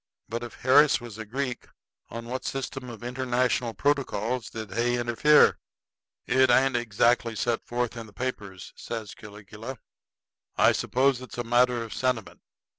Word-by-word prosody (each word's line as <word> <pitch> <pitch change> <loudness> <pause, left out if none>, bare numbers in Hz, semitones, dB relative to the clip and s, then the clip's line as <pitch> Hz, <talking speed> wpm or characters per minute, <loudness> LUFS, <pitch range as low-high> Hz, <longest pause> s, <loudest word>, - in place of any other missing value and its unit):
But 115 +1 -4
if 120 -1 -8
Harris 140 +3 +5
was 120 -3 -10
a 110 - -5
Greek, 125 +2 -4 0.4
on 115 0 -7
what 130 +2 -4
system 135 -1 -4
of 120 -1 -10
international 125 -1 0
protocols 130 -5 -1
did 110 -3 -7
Hay 120 +3 +1
interfere?" 120 +6 +4 0.7
"It 130 +1 +3
ain't 130 +1 +4
exactly 120 0 +1
set 115 +1 -1
forth 120 0 -2
in 115 -1 -7
the - - -15
papers," 100 -4 -6
says 110 -3 -6
Caligula. 105 +4 -10 0.8
"I - - +6
suppose 130 0 +1
it's 130 - -10
a 120 - -1
matter 120 0 +2
of 115 - -8
sentiment. 125 -5 -2
120 Hz, 150 wpm, -27 LUFS, 115-130 Hz, 0.8 s, I